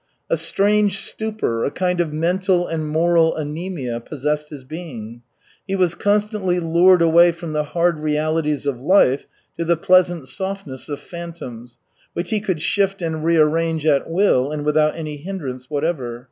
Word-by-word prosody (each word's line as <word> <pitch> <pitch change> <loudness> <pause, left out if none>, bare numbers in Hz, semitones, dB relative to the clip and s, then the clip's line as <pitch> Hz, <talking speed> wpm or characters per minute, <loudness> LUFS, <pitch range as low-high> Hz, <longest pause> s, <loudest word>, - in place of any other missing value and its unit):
A - - +4
strange 200 +4 +2
stupor, 215 - -2
a - - +1
kind 180 +2 0
of 165 -3 -2
mental 175 +3 +1
and 160 -2 -3
moral 165 +1 +3
anæmia 150 -6 -4
possessed 150 +2 -2
his 145 -4 -9
being. 130 -7 -8 0.5
He 195 - -1
was 180 -3 +2
constantly 205 -2 0
lured 175 +2 +4
away 170 +1 +6
from 170 -1 -7
the 150 0 0
hard 170 +1 0
realities 150 -1 0
of 130 -4 -2
life 145 -4 +3 0.3
to - - +1
the 170 0 +2
pleasant 175 -3 +3
softness 190 -9 -5
of 145 - -4
phantoms, 145 -9 -9 0.4
which 170 - -4
he 215 - +1
could 185 -7 -2
shift 195 -1 +1
and 160 -2 -2
rearrange 165 -1 +2
at 145 -1 +2
will 165 -7 +2
and 150 -1 -4
without 150 0 +2
any 155 -2 -5
hindrance 140 -7 -6
whatever. 145 -6 -2
165 Hz, 160 wpm, -21 LUFS, 150-180 Hz, 0.5 s, away